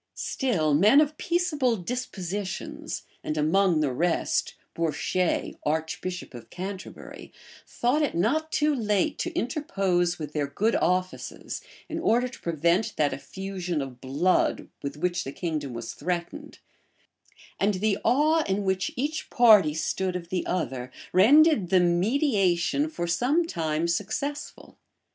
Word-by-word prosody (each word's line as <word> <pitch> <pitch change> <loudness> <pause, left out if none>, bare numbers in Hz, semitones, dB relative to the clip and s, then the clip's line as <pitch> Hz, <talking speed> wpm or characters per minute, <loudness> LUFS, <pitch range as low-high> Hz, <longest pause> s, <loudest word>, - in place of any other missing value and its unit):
Still, 175 - 0
men 210 - +6
of 305 0 +2
peaceable 300 -9 +1
dispositions, 195 -3 -5 0.2
and 155 - -3
among 165 +2 +3
the 140 -4 0
rest 170 +6 0 0.2
Bourchier, 170 +2 -1
archbishop 160 +3 -3
of 120 -2 -11
Canterbury, 190 +1 -8 0.4
thought 250 +6 +1
it 295 - 0
not 295 - +1
too 300 0 +2
late 220 +3 0
to 350 - -2
interpose 195 - 0
with 150 -2 -6
their 145 -2 -1
good 215 +11 0
offices, 185 +1 -2 0.3
in - - -4
order 240 +3 +2
to 245 - -11
prevent 170 +5 +1
that 150 -2 +1
effusion 185 0 -4
of 135 -3 -6
blood, 150 +8 +1
with 140 +1 -5
which 175 +2 -1
the 135 - -6
kingdom 155 -4 -3
was 115 -1 -6
threatened; 180 - -4 1.0
and 200 +1 +2
the 205 +2 0
awe 310 +5 +3
in 195 +1 -1
which 190 -1 0
each 295 +5 -3
party 210 - +6
stood 180 +3 -1
of 170 -2 -5
the 185 0 -1
other, 130 -8 -2 0.2
rendered 245 - +5
the 185 - +5
mediation 195 - +2
for 175 - -3
some 250 - +1
time 160 - -1
successful. 220 - -4
185 Hz, 135 wpm, -26 LUFS, 165-245 Hz, 1.0 s, men